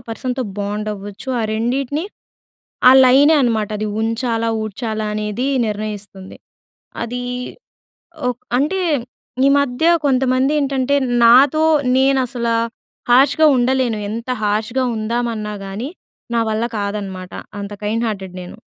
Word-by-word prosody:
పర్సన్‍‌తో 250 +3 -3 0.2
బాండ్ 205 +1 -3
అవ్వచ్చు. 205 +4 -9
ఆ - - 0
రెండిటిని 260 +7 -1 0.9
ఆ - - +9
లైనే 275 +5 +6
అన్నమాట 225 -4 0
అది 215 0 -2
ఉంచాలా, 230 0 -1
ఊడ్చాలా 215 0 -4
అనేది 210 +4 -2 0.2
నిర్ణయిస్తుంది. 205 -2 -6 0.7
అది 245 +2 -4 1.1
ఓహ్, 250 -1 -1 0.2
అంటే 305 +8 0 0.7
ఈ - - +6
మధ్య 275 +1 -1 0.2
కొంతమంది 260 +1 +2
ఏంటంటే, 275 -1 0 0.3
నాతో 275 +6 +6 0.3
నేను 270 0 +3
అసల 235 -1 -3 0.6
హర్ష్‌గా 280 +5 +5
ఉండలేను 250 -2 +1
ఎంత 230 +3 -5
హర్ష్‌గా 220 +5 0
ఉందామన్నా 220 -1 -2
గానీ 210 +8 -5 0.4
నా 230 - +2
వల్ల 220 +1 -1
కాదన్నమాట. 200 -3 -5 0.3
అంత 200 0 -6
కైండ్ 225 +3 -1
హార్టెడ్ 190 -3 -6
నేను. 180 - -11
230 Hz, 115 wpm, -19 LUFS, 210-260 Hz, 1.1 s, ఆ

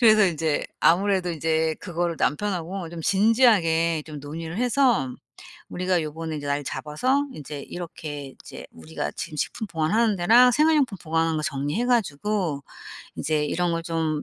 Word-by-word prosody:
그래서 215 -3 +6
인제 160 -3 -1
아무래도 185 +1 +3
인제 160 0 0
그거를 170 -1 -2
남편하고 180 0 -1
좀 165 0 -8
진지하게 190 -7 +3
좀 150 -2 -8
논의를 160 +4 -6
해서 245 - +2 0.6
"우리가 180 -1 0
요번에 160 +1 -5
인제 145 -1 -5
날 145 +1 -1
잡아서 255 - 0
인제 145 -1 -7
이렇게 150 -5 -7
이제 - - -10
우리가 80 -2 -5
지금 150 - -6
식품 220 - -3
보관하는 200 +6 +1
데랑 235 +8 +6
생활용품 295 -6 +3
보관하는 160 -1 0
거 155 - -3
정리해 145 - -1
가지고 195 - 0 0.6
이제 150 0 0
이런 175 +3 0
걸 165 - -2
좀 160 -2 -1
165 Hz, 345 characters per minute, -24 LUFS, 155-205 Hz, 0.6 s, 그래서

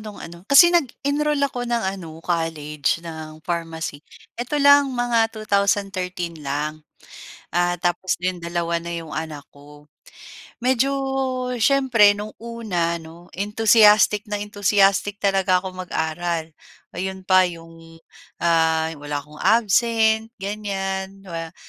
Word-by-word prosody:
no'ng 215 -1 -9
ano, 170 +1 -10
kasi 345 +5 +8
nag-enroll 295 -1 0
ako 245 -3 -3
ng 235 -1 0
ano, 165 -3 -11
college 165 -2 -1
ng 155 -2 -8
pharmacy. 165 -3 -4 0.3
Eto, 245 +5 -3
lang 285 -2 +5
mga 235 -2 +2
2013 195 -5 -1
lang. 150 +2 -3 0.7
Ah, 175 +1 +1
tapos 175 +1 -1
'yon 180 0 -3
dalawa 170 0 -2
na 170 0 -5
'yong 165 -2 -7
anak 150 -3 -5
ko. 145 +1 -16 0.7
Medyo 260 +2 +1 0.7
siyempre 235 -7 +4
no'ng 210 +1 -7
una 195 -8 -2
'no 165 +2 -14
entusiastic 210 +1 +4
na 205 -1 -3
entusiastic 205 -1 +1
talaga 190 -2 +2
ako 185 -1 -7
mag-aral. 165 0 -2 0.4
'Yon 190 +1 -5
pa 185 0 +4
'yong, 165 -1 -12 0.4
ah, 160 -1 +2
wala 145 0 -4
akong 150 +1 -15
absent 225 +1 +2
ganyan. 195 -1 -4
Wa 165 -3 -7
185 Hz, 120 wpm, -22 LUFS, 165-215 Hz, 0.7 s, kasi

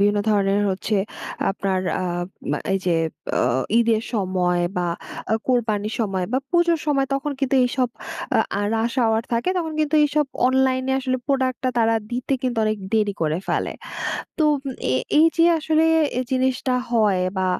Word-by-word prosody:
বিভিন্ন 205 +1 +3
ধরনের 200 -1 +2
হচ্ছে 195 +3 -1 0.5
আপনার 195 -1 -1 0.2
আ - - -1 0.5
মা - - 0
এই 195 - +2
যে, 170 - +3 0.3
বে 130 - 0
ঈদের 225 -2 +2
সময় 185 -3 +1
বা 175 - 0 0.5
আ - - +5
কোরবানির 220 -4 0
সময়, 190 -4 -1
বা 260 - +3
পুজোর 345 -1 +3
সময়, 275 -2 +2
তখন 280 +2 -2
কিন্তু 270 -1 +1
এইসব 250 0 0 0.7
আ - - 0 0.2
রাশ 230 +1 0
hour 225 0 +2
থাকে 235 +7 0
তখন 320 -2 -3
কিন্তু 305 0 0
এইসব 295 +1 +1 0.2
অনলাইনে 260 0 +2
আসলে 255 -1 -1
প্রোডাক্ট 260 -3 0
টা - - +3
তারা 225 0 +3 0.2
দিতে 250 +3 -2
কিন্তু 245 -3 -1
অনেক 215 0 0
দেরি 210 -2 +2
করে 155 +2 0
ফেলে। - - 0 0.7
তো 310 - +3 0.2
ম - - -1 0.3
এ - - +3 0.2
এই 320 - +7
যে, 330 - +5
আসলে 315 +1 +2 0.5
জিনিসটা 260 0 +1 0.2
হয় 210 -5 +3 0.2
বা 185 - +1
235 Hz, 165 wpm, -22 LUFS, 205-265 Hz, 0.7 s, এই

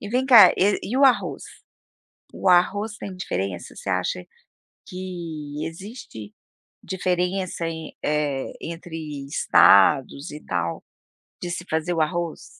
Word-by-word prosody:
E 205 - -7
vem 250 +4 0
cá, 240 -5 +9
e 200 +2 +2
e 245 - -3
o 275 - +5
arroz? 265 -2 +2 0.9
O 195 - -1
arroz 205 +4 +3
tem 190 - -7
diferença? 95 - -4
Você - - -8
acha 90 -1 -2 0.6
que 165 -5 -6
existe 165 - -9 0.5
diferença 180 -1 -2
em 160 -1 -7
eh, 145 -3 -1
entre 160 -4 -7
estados 110 - +4
e 150 - -8
tal, 85 -2 -3 0.6
de 175 - -4
se 175 0 -5
fazer 160 +2 -1
o 165 - 0
arroz? 170 +1 -2
165 Hz, 130 wpm, -23 LUFS, 140-185 Hz, 0.9 s, cá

